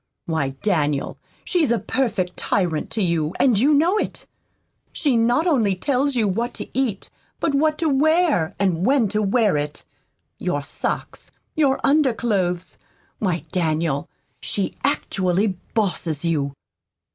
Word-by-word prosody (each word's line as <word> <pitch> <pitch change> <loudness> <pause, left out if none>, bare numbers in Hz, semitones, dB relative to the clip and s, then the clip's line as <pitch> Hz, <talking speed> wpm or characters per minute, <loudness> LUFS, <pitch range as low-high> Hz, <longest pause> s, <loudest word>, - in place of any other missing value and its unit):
Why, 150 -5 -1
Daniel, 150 -8 0 0.3
she's 335 - +2
a 235 - +3
perfect 215 -9 -1
tyrant 175 -6 -1
to 220 - -1
you, 170 -2 0
and 240 -7 +4
you 275 +6 +4
know 345 +8 +3
it. - - -4 0.7
She 285 -6 0
not 240 +7 +2
only 230 - +2
tells 275 +6 0
you 225 -4 +2
what 230 +6 -2
to - - -6
eat, 245 -7 -1 0.3
but 315 - 0
what 305 +2 +2
to 325 - 0
wear, 300 - +3
and 185 -4 +1
when 255 -2 +3
to 210 +2 0
wear 210 -4 +2
it 145 0 -4 0.6
your - - -1
socks, - - -4 0.2
your 280 -4 +2
underclothes. 225 - +1 0.4
Why, 180 -5 -1
Daniel, 160 -4 0 0.3
she 200 -2 -2
actually 195 -7 0 0.2
bosses 175 -7 -1
you!" 145 -4 0
210 Hz, 135 wpm, -22 LUFS, 175-270 Hz, 0.7 s, and